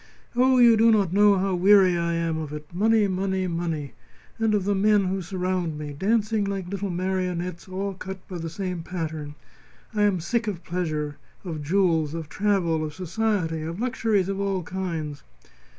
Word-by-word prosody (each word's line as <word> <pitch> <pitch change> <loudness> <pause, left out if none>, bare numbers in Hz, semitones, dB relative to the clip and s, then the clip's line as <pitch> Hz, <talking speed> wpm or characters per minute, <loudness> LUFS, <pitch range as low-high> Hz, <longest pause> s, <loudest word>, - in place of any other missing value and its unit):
Oh! 255 +1 +4
you 235 -2 +7
do 225 +1 +5
not 200 -6 +3
know 205 0 +5
how 190 0 0
weary 185 0 +5
I 170 0 0
am 165 -1 -1
of 155 -2 -5
it 150 +2 -8
money, 215 +3 +3
money, 190 0 -1
money! 165 -6 -3 0.5
And 220 -1 +2
of 200 - +1
the 205 - +2
men 205 +1 +3
who 190 +1 -1
surround 180 -3 -2
me, 150 -1 -6
dancing 210 +5 +1
like 195 -2 -3
little 200 0 -3
marionettes 180 -1 -2
all 195 +1 -3
cut 190 0 -8
by 180 -2 -6
the 165 0 -4
same 180 0 -4
pattern. 160 -4 -5 0.6
I 210 - 0
am 205 -3 +3
sick 225 +7 -1
of 185 -5 -4
pleasure, 155 -5 -3 0.3
of 160 -4 -4
jewels, 165 -2 +1
of 160 -2 -6
travel, 185 -6 +1
of 155 -1 -5
society, 185 -3 -1
of 165 +4 -5
luxuries 225 -6 +1
of 195 0 -2
all 195 -2 -1
kinds." 165 -6 -4
185 Hz, 180 wpm, -25 LUFS, 165-200 Hz, 0.6 s, you